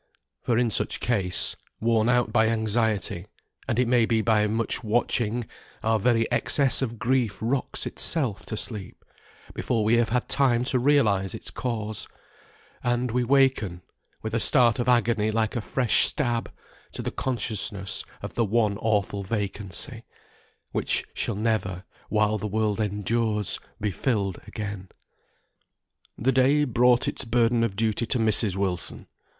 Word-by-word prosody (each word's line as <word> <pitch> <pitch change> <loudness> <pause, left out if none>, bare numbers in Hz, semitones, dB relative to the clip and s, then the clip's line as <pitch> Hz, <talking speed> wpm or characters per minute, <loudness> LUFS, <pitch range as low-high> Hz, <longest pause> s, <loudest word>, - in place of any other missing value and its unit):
For 120 - 0
in 120 -2 +2
such - - +3
case, 95 -7 +2 0.2
worn 115 0 +2
out 120 -3 +2
by 110 -2 +4
anxiety, 110 -4 -1 0.4
and 115 - -1
it 125 -1 +2
may 120 -2 +3
be 110 -2 +1
by 105 -1 +3
much 115 +3 -1
watching, 115 +1 0 0.4
our 110 0 +2
very 115 +1 +2
excess 130 +3 +2
of 120 -3 -3
grief 120 -3 0
rocks 125 +4 -2
itself 130 - +2
to 110 - -4
sleep, 105 -4 -5 0.5
before 115 -3 -1
we 110 +2 +3
have 120 -1 +2
had 125 +1 0
time 125 -4 +2
to 130 0 +1
realise 110 -9 +2
its - - -8
cause; 110 -4 -4 0.8
and 120 0 0
we 125 +1 +1
waken, 125 -9 +2 0.4
with 110 0 -4
a 115 - +1
start 120 -1 +3
of 120 - 0
agony 120 -3 +2
like 110 0 -1
a 120 - -1
fresh 125 +1 +1
stab, 120 -6 -2 0.4
to - - -6
the - - -3
consciousness 105 -5 -3 0.2
of - - -6
the 120 - +1
one 105 -1 +1
awful 100 -3 0
vacancy, 100 -2 -4 0.7
which - - -1
shall - - -2
never, 100 -4 -1 0.3
while 105 0 +1
the 105 - -3
world 110 0 -1
endures, 105 0 0 0.2
be 105 -1 -1
filled 100 -4 -1
again. 100 -3 -6 1.3
The 130 +4 +1
day 135 +3 +3
brought 125 -1 +3
its - - -3
burden 115 0 +2
of 110 -4 -1
duty 110 +2 0
to 125 - 0
Mrs. 110 -3 +3
Wilson. 95 -3 -3
115 Hz, 150 wpm, -25 LUFS, 105-120 Hz, 1.3 s, by